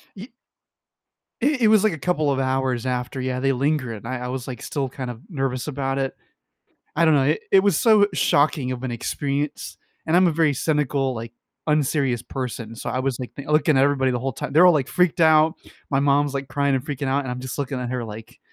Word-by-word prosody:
Ye 220 +5 -10 1.1
It 280 0 +1
it 220 - +5
was 215 -2 +5
like 215 -5 +2
a 155 - -7
couple 155 -2 0
of 135 - 0
hours 130 -2 -1
after, 125 +1 -3
yeah, 130 0 -2
they 135 +1 +1
linger, 135 -2 0
and 110 +2 -9
I 130 0 -3
I 125 - -5
was, 130 0 -5
like, 125 -3 -7
still 135 -3 -3
kind 130 -2 -6
of 120 0 -8
nervous 135 -4 -3
about 135 -2 -2
it. 135 -1 -2 0.8
I 170 - +4
don't 160 -2 +5
know. 135 -2 +3
It 150 +3 +1
it 195 - +6
was 195 -5 +2
so, 215 -3 +5
shocking 145 -4 +2
of 125 -1 -6
an 130 - -3
experience, 140 +4 -3 0.3
and 160 - +2
I'm 185 +1 +5
a 170 - +2
very 155 -2 +2
cynical, 140 -2 0
like, 115 0 -7 0.3
unserious 140 -5 +1
person, 120 -4 -6
so, - - -5
I 125 - -2
was, 130 -2 -2
like, 125 - -7
th 140 +1 -9
looking 155 0 +3
at 135 - +5
everybody 135 -2 +2
the 125 - -1
whole 135 +2 -3
time. 130 - -6
They're 170 +4 +7
all, 180 - +7
like, 145 -4 0
freaked 180 -1 +1
out, 160 0 +5 0.4
my 135 - +2
mom's, 145 0 +2
like, 135 0 -4
crying, 140 -1 0
and 130 +1 -2
freaking 140 -2 -4
out, 135 +1 0
and 125 - -4
I'm 125 0 -5
just 130 +2 -6
looking 135 -1 -3
at 125 -1 -4
her 125 -2 -3
like, 110 0 -10
135 Hz, 235 wpm, -23 LUFS, 130-150 Hz, 1.1 s, They're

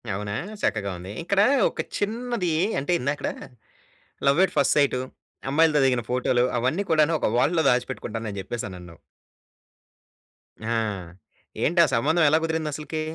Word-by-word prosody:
అవునా! 105 0 -4 0.3
చక్కగా 100 -3 0
ఉంది. 90 +2 -9
ఇక్కడ 200 +3 +2 0.3
ఒక - - -4 0.2
చిన్నది 225 -3 -2 0.3
అంటే, 145 +6 -1
ఇందాకడ 140 +3 -2 1.0
లవ్ 140 +6 +4
ఎట్ - - -2
ఫస్ట్ 140 - +3
సైటు, 140 -3 +2 0.5
అమ్మాయిలతో 155 +1 +4
దిగిన 125 -3 +1
ఫోటో‌లు, 125 -1 +2
అవన్నీ 130 +12 0
కూడాను. 155 0 +3
ఒక - - +1
వాల్ట్‌లో 160 +5 +2
దాచిపెట్టుకుంటాను 115 -2 -2
అని 100 - -7
చెప్పేసనన్నావ్. 90 -5 -7 1.6
ఆ! - - -4 1.0
ఏంటా 170 +2 +4
సంబంధం 155 +8 +2
ఎలా 155 - +4
కుదిరిందసలకి? 155 -1 -3
145 Hz, 125 wpm, -24 LUFS, 120-165 Hz, 1.6 s, లవ్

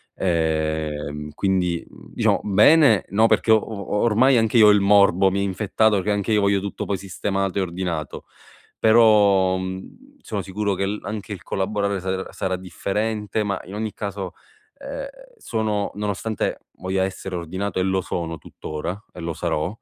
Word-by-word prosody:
ehm, 80 -3 -1
quindi 90 -2 0
mhmm, - - -16
diciamo - - +2
bene 110 - +5
no, 110 +4 +4
perché 110 +1 +2
o 110 - +8
o 105 -2 -4
ormai 120 +3 +4
anche 115 +1 +2
io 110 -2 +8
ho - - +8
il 105 -1 +4
morbo, 100 -1 +5
mi 100 +1 0
infettato, 105 +1 +1
che 105 +3 -1
anche 100 +2 -1
io 105 -1 +3
voglio 100 -1 +2
tutto 100 - -5
poi 100 - -1
sistemato 95 0 -3
e - - +1
ordinato, 85 -4 -4 0.5
però, 105 -4 +5
mhmm, 95 - -8
sono 105 - -4
sicuro 100 +1 -2
che 95 +1 -1
l 105 +1 -3
anche 105 +1 -5
il 90 - -10
collaborare 100 0 -1
sare 95 +1 -3
sarà 95 -1 -2
differente 105 +3 -2
ma 100 -2 -2
in 95 - -10
ogni 110 0 -3
caso, 100 -3 -5 0.4
ehm, - - -6 0.3
sono 110 - -2
nonostante 105 +1 -2 0.2
voglia 95 +1 -1
essere 95 -1 -4
ordinato 95 +3 -3
e - - +2
lo 95 0 +1
sono 85 -2 -4
tuttora, 85 +8 -6
e - - -10
lo 85 0 -3
sarò, 75 0 -1
100 Hz, 165 wpm, -22 LUFS, 95-105 Hz, 0.5 s, o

